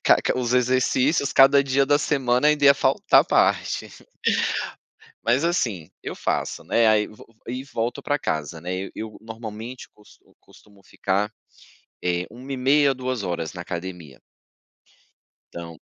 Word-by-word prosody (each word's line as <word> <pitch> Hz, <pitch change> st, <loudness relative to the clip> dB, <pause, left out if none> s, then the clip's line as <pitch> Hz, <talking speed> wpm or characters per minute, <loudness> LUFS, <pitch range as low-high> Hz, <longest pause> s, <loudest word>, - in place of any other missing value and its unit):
ca -, -, +6 dB
ca -, -, 0 dB
os 125 Hz, -1 st, -1 dB
exercícios 130 Hz, +3 st, +2 dB
cada 140 Hz, +1 st, +6 dB
dia 135 Hz, +1 st, +2 dB
da 145 Hz, +1 st, +3 dB
semana 135 Hz, -2 st, +1 dB
ainda 150 Hz, -1 st, +2 dB
ia 140 Hz, 0 st, +8 dB
faltar 135 Hz, -1 st, +4 dB
a -, -, -15 dB
parte, -, -, +1 dB, 1.4 s
mas 125 Hz, +6 st, +2 dB
assim 110 Hz, -, -1 dB
eu -, -, -5 dB
faço, -, -, -2 dB
né. 115 Hz, -1 st, +3 dB
Aí 105 Hz, -1 st, +3 dB
vo 105 Hz, -, -14 dB, 0.2 s
e 130 Hz, +2 st, -4 dB
volto 125 Hz, 0 st, -3 dB
pra 145 Hz, 0 st, 0 dB
casa, 80 Hz, -, -3 dB
né, 90 Hz, +2 st, -4 dB
e -, -, -10 dB
eu 110 Hz, -1 st, -7 dB
normalmente 110 Hz, +2 st, -8 dB
costu 105 Hz, -, -23 dB
costumo 100 Hz, -2 st, -21 dB
ficar 100 Hz, +3 st, -1 dB, 0.7 s
é 90 Hz, 0 st, -1 dB
1h30, 135 Hz, +3 st, +1 dB
2h 130 Hz, -3 st, -3 dB, 0.3 s
na 90 Hz, -, -7 dB
academia. 85 Hz, -5 st, -7 dB, 1.3 s
Então 85 Hz, -1 st, -8 dB
120 Hz, 140 wpm, -23 LUFS, 100-135 Hz, 1.4 s, ia